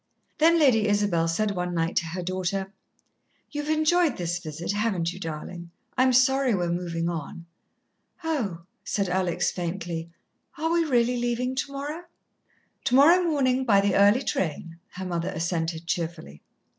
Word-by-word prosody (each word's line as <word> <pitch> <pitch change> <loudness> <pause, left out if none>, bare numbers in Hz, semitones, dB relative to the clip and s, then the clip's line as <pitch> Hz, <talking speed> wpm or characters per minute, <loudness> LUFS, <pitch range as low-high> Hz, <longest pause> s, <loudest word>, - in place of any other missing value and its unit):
Then 330 +2 +5
Lady 245 -9 +4
Isabel 205 -5 +2
said 205 +6 0
one 180 -2 -3
night 165 +1 -1
to 170 - +1
her 175 +2 -4
daughter: 185 +2 -2 0.8
"You've 295 0 -4
enjoyed 310 0 +2
this 175 -1 -2
visit, 165 0 -5
haven't 200 -5 -1
you, 185 - -10
darlin'? 170 +1 -6 0.3
I'm 255 0 +4
sorry 260 -1 +3
we're 175 -2 -1
movin' 170 -1 -2
on." 170 0 -5 0.8
"Oh," 235 - -2 0.2
said 200 -3 -1
Alex 180 -1 0
faintly, 170 -2 -4 0.5
"are 320 +2 -1
we 335 -1 +2
really 245 -3 +2
leaving 240 +1 -1
tomorrow?" 285 +5 -4 0.8
"Tomorrow 290 +8 +6
morning, 265 -6 +1
by 210 -6 +4
the 200 0 +2
early 205 +6 +5
train," 165 - -3
her 190 +1 -6
mother 170 -1 -2
assented 165 0 -2
cheerfully. 165 - -4
195 Hz, 145 wpm, -26 LUFS, 170-260 Hz, 0.8 s, Tomorrow